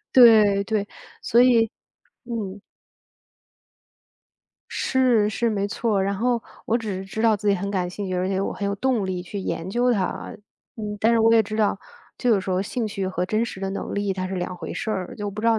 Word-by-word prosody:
对 215 -5 +7
对， 210 -1 -1 0.4
所 235 - +4
以 230 -3 +4 0.5
嗯。 210 -5 -5 2.1
是 245 -5 +2
是， 230 +2 0
没 200 -2 0
错， 205 -1 0
然 200 +1 0
后 235 +2 0 0.2
我 230 - +2
只 215 -4 -4
是 190 - -6
知 220 +3 -4
道 225 -2 +4
自 205 +1 -2
己 200 - +5
很 200 +1 -3
感 185 -3 -1
兴 195 +3 -5
趣， 185 - -2
而 180 0 0
且 190 0 0
我 195 - -1
很 200 - -3
有 200 - 0
动 235 -2 0
力 185 -1 -3
去 200 +3 -6
研 180 -2 -3
究 245 +5 +2
它。 195 -5 -2 0.4
嗯， 210 -2 -4
但 225 +2 +4
是 230 - +4
我 225 0 +5
也 225 - +6
知 215 +1 -5
道 215 -2 +1 0.4
这 250 - +1
个 210 -4 +4
时 190 - -5
候 185 +1 +1
兴 225 +3 -3
趣 200 -2 -3
和 180 -1 -2
真 215 +3 +1
实 210 -4 -7
的 195 - -2
能 195 - -4
力 200 -1 0
它 185 -1 -3
是 190 - -4
两 180 0 -3
回 - - -6
事 220 - -3
儿， 185 -4 -3
就 205 -1 -4
不 205 +2 -6
知 225 - -1
道 225 -1 +4
205 Hz, 240 characters per minute, -24 LUFS, 195-225 Hz, 2.1 s, 对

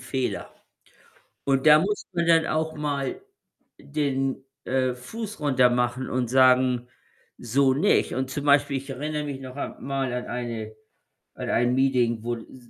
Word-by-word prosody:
Fehler. 130 -1 -3 0.9
Und 135 +1 +1
da 150 0 +9
muss 205 +5 -2
man 170 -1 0
dann 165 -1 +4
auch 160 0 -1
mal 145 - -3 0.6
den, 135 -2 -2 0.2
äh, 130 -1 0
Fuß 210 - -7
runtermachen 125 -2 +2
und 125 -2 -1
sagen: 125 -1 +4 0.5
„So 130 +3 +2
nicht.“ 175 +10 +2
Und 130 0 -2
zum 145 +1 -4
Beispiel, 140 -1 +4
ich 135 +1 -10
erinnere 150 +3 -3
mich 140 -2 -5
noch 130 0 -9
a 145 - -5
mal 135 -2 -2
an 125 0 -3
eine 115 -3 -5 0.6
an - - -5
ein 120 +1 +2
Meeting, 125 -4 +2
wo 120 0 -2
s 120 +1 -14
130 Hz, 150 wpm, -25 LUFS, 125-145 Hz, 0.9 s, da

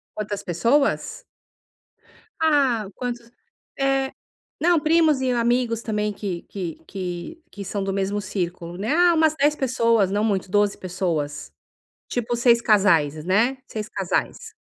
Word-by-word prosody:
Quantas 205 -1 -4
pessoas? 275 - 0 1.2
Ah, 275 -9 +2
quantos 240 -2 -5 0.5
eh. 270 -1 +1 0.5
Não, 345 0 +4
primos 310 -2 +3
e 260 -1 0
amigos 235 -1 +1
também, 210 -2 -1
que 190 -4 -5
que 180 -5 -6
que 185 - -6
que 200 - -8
são 195 +1 -3
do 195 0 -2
mesmo 195 +1 -1
círculo, 175 -3 -4
né. 210 +7 -2
Ah, 350 +1 +5
umas 315 -1 +3
10 295 +1 +2
pessoas, 230 -6 +2
não 205 +2 0
muito, 195 -3 0
12 205 0 +2
pessoas, 160 - -3 0.6
tipo, 240 0 -2
6 235 0 +4
casais, 165 -9 +3
né, 220 +9 +2
6 210 -1 -5
casais. 445 - -3
215 Hz, 135 wpm, -23 LUFS, 190-265 Hz, 1.2 s, Ah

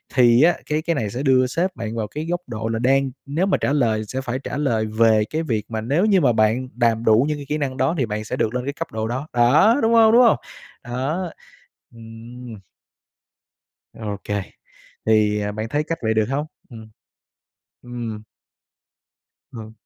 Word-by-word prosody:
thì 120 0 +5
á 175 - +5
cái 150 +1 -1
cái 170 0 -1
này 110 -6 -2
sẽ 125 +6 -4
đưa 130 -2 +3
sếp 180 +7 -2
bạn 115 0 -5
vào 110 -2 -2
cái 150 +7 -6
góc 175 0 -1
độ 110 -1 -4
là 115 0 -2
đang 135 +1 +2
nếu 155 +7 0
mà 195 - +2
trả 140 - -1
lời 110 -6 +1
sẽ 130 +3 -4
phải 130 0 -3
trả 135 - -5
lời 115 -7 0
về 110 0 +3
cái 160 +1 -2
việc 110 -7 -2
mà 110 -1 -2
nếu 145 - +1
như 195 -4 +3
mà 125 -4 +4
bạn 110 +4 +1
đàm 115 -1 +1
đủ 110 +4 +5
những 150 -1 -1
cái 140 - -8
kỹ 150 - 0
năng 135 -3 -3
đó 135 +7 +1
thì 130 - +1
bạn 105 0 -4
sẽ - - -4
được 110 - -1
lên 125 - -1
cái 140 - -3
cấp - - -5
độ 110 0 -3
đó. 130 +6 -4
Đó, 140 - +4
đúng 225 +1 +2
hông, 225 -1 +6
đúng 240 +2 +6
hông? 230 - +5 0.5
Đó, 145 +9 -3 0.6
ừm. 115 0 -11 1.3
Ô 105 -3 -5
kê, 105 -1 -2 0.6
thì, 105 -1 +3
à, 105 0 -2
bạn 110 +1 -4
thấy 150 +1 0
cách 165 - -2
vậy 110 -1 0
được 110 -1 +2
hông? 145 +3 -1 0.2
Ừm. 110 -2 -11 0.9
Ừm. 115 -3 -6 1.3
Ờ. 110 -2 -9
125 Hz, 200 wpm, -21 LUFS, 110-145 Hz, 1.3 s, hông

